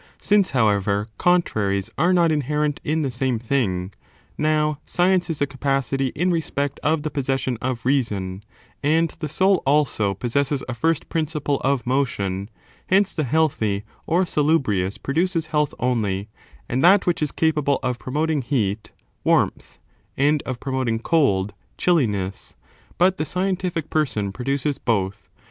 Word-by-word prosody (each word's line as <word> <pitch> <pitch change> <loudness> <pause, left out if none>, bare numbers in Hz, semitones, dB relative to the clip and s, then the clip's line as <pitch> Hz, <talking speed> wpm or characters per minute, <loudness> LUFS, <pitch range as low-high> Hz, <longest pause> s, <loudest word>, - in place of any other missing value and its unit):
Since, 205 -2 +3
however, 105 -3 +1
contraries 110 - +1
are 175 +5 +2
not 170 -3 +4
inherent 150 0 0
in 155 +1 0
the 135 - -1
same 125 0 0
thing 105 -7 -1 0.2
— - - -33
now, 150 -1 +1
science 180 0 +1
is 160 -3 -3
a - - +3
capacity 135 -1 -1
in 175 +4 +1
respect 145 -4 -2
of 155 0 +1
the 155 - -3
possession 135 -2 -1
of 125 -2 -3
reason,^ 105 -8 0 0.4
and 160 +3 +2
the 155 -3 -3
soul 190 +4 +3
also 135 -8 +2
pos 120 +5 -4
sesses 140 -1 +1
a 130 - -3
first 160 +6 0
principle 150 -3 -1
of 135 -2 +1
motion 100 -7 -1 0.2
— - - -31
hence 195 +1 +3
the 155 - -1
healthy 115 -8 +1 0.2
or 175 +3 +2
salubrious 135 - +1
produces 165 +3 0
health 150 -2 +1
only, 110 -5 -1 0.4
and 125 +4 -1
that 190 +3 +6
which 175 -2 0
is 150 - 0
capable 150 -3 +1
of 125 -1 -1
promoting 150 +2 -1
heat 110 -5 -1 0.2
— - - -43
warmth, - - +1 0.4
and 145 +2 +3
of 130 -2 -3
promoting 130 -4 -1
cold 110 - +1
— - - -40
chilli 165 -10 +3
ness; 95 -2 -5 0.4
but 185 +1 +3
the - - +1
scientific 180 -2 -2
person 110 -10 0
produces 140 +5 -2
both. 100 -4 -1
140 Hz, 155 wpm, -22 LUFS, 115-160 Hz, 0.4 s, that